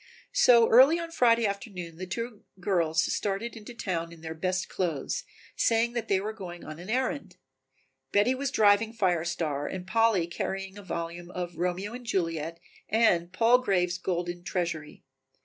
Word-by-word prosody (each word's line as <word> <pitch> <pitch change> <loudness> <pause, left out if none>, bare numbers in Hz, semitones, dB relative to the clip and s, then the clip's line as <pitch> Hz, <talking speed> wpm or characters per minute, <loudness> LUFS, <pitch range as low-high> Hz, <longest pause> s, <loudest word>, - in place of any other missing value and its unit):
So 245 - +6
early 265 +8 +7
on 335 -1 -5
Friday 235 -6 +4
afternoon 195 -5 -4
the 185 +1 -6
two 230 +3 -5 0.2
girls 170 -3 +1
started 205 +4 -2
into 225 +2 -10
town 170 -6 -3
in 165 -1 -13
their 160 0 -5
best 185 +3 -1
clothes, 175 - -2 0.3
saying 230 +1 +2
that 235 -2 -3
they 195 - +2
were 210 +3 -4
going 175 -5 -8
in - - -11
on 155 +1 -8
an 180 +4 -9
errand. 255 -5 -2 0.7
Betty 210 +5 +4
was 275 +1 -2
driving 215 +1 +4
Fire 180 -7 +1
Star 155 -4 -2
and 185 -1 -5
Polly 220 -3 +3
carrying 195 +3 -4
a 205 - -9
volume 170 -1 -5
of 175 -1 -5
"Romeo 180 +5 -2
and 250 +1 -7
Juliet" 165 -4 -1 0.3
and 185 -6 +3
"Palgrave's 195 -5 +3
Golden 175 -1 -3
Treasury." 170 -5 -3
190 Hz, 165 wpm, -28 LUFS, 175-225 Hz, 0.7 s, early